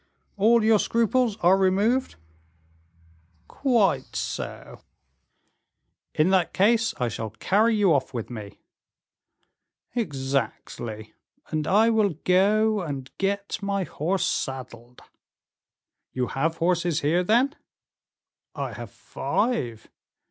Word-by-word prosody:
"All 225 +3 +4
your 220 -1 +4
scruples 230 0 +1
are 180 +2 +5
removed?" 200 +7 +1 1.3
"Quite 205 - +1
so." - - -5 1.3
"In 155 +5 +3
that 185 -3 +2
case 230 +4 +3
I 125 - +1
shall 110 0 -4
carry 205 - +1
you 200 -5 +4
off 135 -2 0
with 120 -2 -5
me." 105 -4 -8 1.4
"Exactly; 135 - -3 0.4
and 155 -1 -2
I 220 +4 +4
will 210 -6 +2
go 210 +3 +3
and 135 -6 -6
get 200 +2 -2
my 200 -1 -1
horse 175 +3 -1
saddled." 125 -2 -5 1.1
"You 125 -1 -2
have 160 +4 -1
horses 175 -2 +1
here, 165 +5 +2
then?" 240 +9 +2 1.0
"I - - -4
have - - -8
five." 120 - -2
185 Hz, 105 wpm, -25 LUFS, 135-215 Hz, 1.4 s, are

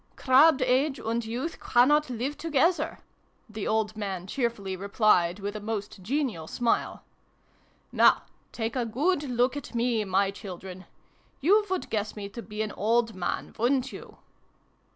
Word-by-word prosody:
" - - -36
Crabbed 270 +1 +5
age 265 +3 +2
and 230 +1 -2
youth 245 +9 -4
cannot 295 +4 +3
live 255 +4 -3
to 330 - -4
gether! 310 +2 +2 0.3
" - - -40
the 215 -2 -5
old 220 -1 0
man 195 -4 -4
cheerfully 215 -4 -2
replied, 195 -2 +2
with 205 +1 -5
a - - -3
most 210 -2 -5
genial 230 - -2
smile. 235 +5 -1 0.5
" - - -36
Now - - +5 0.3
take 225 +1 -3
a 250 - +1
good 295 +9 +1
look 250 -1 0
at 285 -3 -7
me, 235 -2 +1
my 195 0 +1
children! 185 -1 -9 0.5
You 410 +8 +4
would 375 -1 -3
guess 215 -1 -2
me 200 -2 -6
to 235 - -8
be 215 -1 -4
an 215 - -4
old 230 +3 +1
man, 185 -2 -3
wouldn't 255 +2 +1
you - - -11
230 Hz, 165 wpm, -27 LUFS, 205-265 Hz, 0.5 s, Crabbed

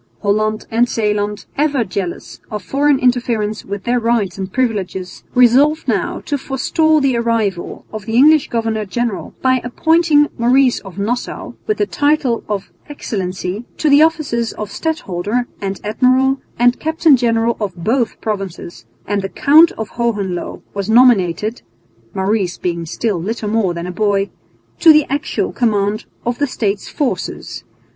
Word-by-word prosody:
Holland 215 +1 0
and 235 +2 +2
Zeeland, 210 -2 -1
ever 290 -4 +2
jealous 185 -3 -5
of 210 -3 -5
foreign 280 +5 +2
interference 235 -4 0
with 200 0 -6
their 245 +1 +1
rights 230 -4 0
and 190 0 -4
privileges, 195 -7 -2
resolved 270 +6 +4
now - - -1
to 285 -1 -2
forestall 310 +4 +1
the 275 -3 +1
arrival 225 -6 -1
of 215 -1 -7
the 225 - -2
English 300 +3 +5
governor 225 -2 -1
general 230 +2 -3
by 255 -1 +3
appointing 305 +3 +3
Maurice 250 +2 +3
of 190 -2 -12
Nassau, 230 +5 -3
with 430 - 0
the 415 - +1
title 290 - +1
of 200 -2 -3 0.2
"Excellency," 195 -5 -4
to 305 - +1
the 285 +1 +7
offices 305 -8 +1
of 210 -1 -6
Stadholder 240 - -2 0.2
and 195 -1 -3
Admiral 255 +5 +2 0.2
and 245 +1 +3
Captain 320 -1 +3
General 230 -1 +1
of 200 -4 -3
both 225 +7 -1
provinces; 190 - -5 0.2
and 205 0 -1
the 195 - -4
Count 315 - +5
of 220 -1 -6
Hohenlo 205 -7 -3
was 200 0 -4
nominated 220 -3 +3 0.5
(Maurice 190 -1 0
being 170 -2 -3
still 200 0 -2
little 215 +3 -3
more 205 -6 +1
than 170 0 -4
a 180 - -4
boy) 200 +1 0 0.5
to 330 - +8
the 305 -2 +5
actual 285 +2 -1
command 210 -2 0 0.2
of 240 0 -2
the 290 - +1
State's 205 -5 -2
forces. 220 - -3
230 Hz, 150 wpm, -17 LUFS, 200-260 Hz, 0.5 s, to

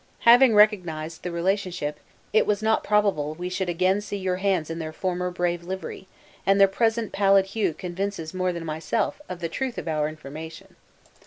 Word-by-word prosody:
Having 240 0 +7
recognized 175 -7 +2
the 180 - -4
relationship, 175 -4 -1 0.3
it 215 - +4
was 210 0 0
not 220 0 +2
probable 195 -8 +1
we 180 +2 -4
should 185 0 -2
again 185 +3 +2
see 205 -1 -5
your 185 -1 -1
hands 185 -5 0
in 165 - -4
their 155 -1 -4
former 180 +2 -2
brave 175 -1 -1
livery; 190 +1 -6 0.4
and 195 0 +3
their 195 - +8
present 225 +2 0
pallid 195 -1 +4
hue 195 -4 -1
convinces 180 -2 -4
more 185 0 0
than 170 -1 -6
myself, 160 - -2
of 180 -1 -6
the 165 - -1
truth 255 +8 -4
of - - -5
our 155 -1 0
information." 155 +1 -10
185 Hz, 180 wpm, -25 LUFS, 165-200 Hz, 0.4 s, their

